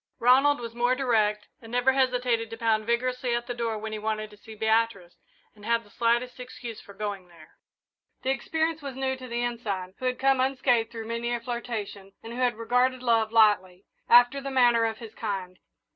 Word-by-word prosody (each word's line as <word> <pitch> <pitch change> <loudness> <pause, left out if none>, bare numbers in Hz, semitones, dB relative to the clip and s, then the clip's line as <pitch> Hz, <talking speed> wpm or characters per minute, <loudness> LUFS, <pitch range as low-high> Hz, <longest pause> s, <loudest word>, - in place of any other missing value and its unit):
Ronald 270 +4 +4
was 230 -1 -7
more 245 +2 +2
direct 215 -5 +1
and 225 -1 -12
never 245 +2 +3
hesitated 250 -3 +1
to 225 - -7
pound 220 -2 +1
vigorously 250 +1 0
at 240 0 -3
the 245 - -4
door 230 -2 -2
when 220 +1 -6
he 215 - -4
wanted 215 0 -3
to 210 - -15
see 220 +1 -12
Beatrice 220 -4 0 0.4
and 210 - -18
had 230 +1 +1
the 205 - -21
slightest 240 +3 0
excuse 245 -2 -8
for 200 - -14
going 200 -3 -5
there. 165 -3 -18 0.7
The 265 - +1
experience 320 +4 -1
was 275 -2 -6
new 265 0 -1
to 255 -1 -10
the 240 0 -2
Ensign, 205 -6 -3
who 255 - -5
had 250 0 0
come 270 0 +3
unscathed 255 -3 +2
through 225 -1 -7
many 235 +1 -3
a 240 - -1
flirtation, 225 -5 -5
and 225 +1 -8
who 245 - -6
had 250 -2 +2
regarded 250 +2 +1
love 225 -2 +2
lightly, 205 -4 +3 0.2
after 245 +3 +6
the 275 - -4
manner 240 -3 +4
of 225 -1 -2
his 225 -2 -10
kind. 190 -5 -5
235 Hz, 205 wpm, -27 LUFS, 215-250 Hz, 0.7 s, after